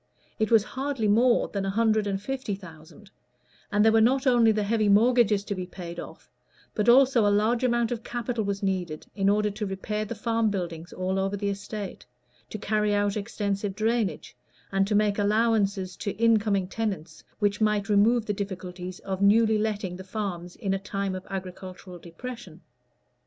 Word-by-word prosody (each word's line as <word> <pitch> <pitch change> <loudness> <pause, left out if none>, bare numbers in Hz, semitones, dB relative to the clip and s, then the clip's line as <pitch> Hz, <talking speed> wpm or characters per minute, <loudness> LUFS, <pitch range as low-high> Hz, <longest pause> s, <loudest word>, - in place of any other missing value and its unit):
It 220 - +1
was 225 -3 +5
hardly 265 -2 -2
more 235 +4 +4
than 200 -1 -3
a 195 - -1
hundred 215 0 +2
and 195 -1 -1
fifty 260 -1 -3
thousand; 185 +2 -14 0.6
and 210 +1 +3
there 225 - +6
were 225 0 +4
not 260 +4 +3
only 240 -3 +5
the 215 -1 0
heavy 215 0 +1
mortgages 215 -1 +4
to 205 - -3
be 185 -2 -5
paid 175 -2 -8
off, - - -10 0.5
but 210 +2 +1
also 260 -1 +6
a 205 - +4
large 215 +4 +2
amount 240 -2 +1
of 235 -2 -3
capital 240 -2 -3
was 200 0 -3
needed 180 -5 -2
in 195 -1 +1
order 210 +1 +2
to 210 +1 -4
repair 210 +2 -3
the 215 +2 -5
farm 225 0 0
buildings 175 -4 -4
all 185 +1 -2
over 195 +1 -1
the 200 0 -1
estate, 200 - -6 0.4
to - - -5
carry 210 0 0
out 205 -1 +1
extensive 200 -2 -3
drainage, 220 -6 -1 0.4
and 195 +2 +1
make 210 0 +2
allowances 205 -3 +1
to 205 - -3
in 225 +1 +4
coming 200 -3 0
tenants, 190 -7 -4
which 205 0 0
might 210 -2 +2
remove 215 +3 +3
the 210 - -1
difficulties 185 -2 -6
of 190 -1 -4
newly 215 +2 +4
letting 205 -4 -2
the 190 - -8
farms 185 -3 -5
in 195 -2 -2
a 195 - -1
time 195 0 -3
of 185 0 -7
agricultural 185 -1 -7
depression. 180 0 -9
205 Hz, 180 wpm, -26 LUFS, 195-220 Hz, 0.6 s, there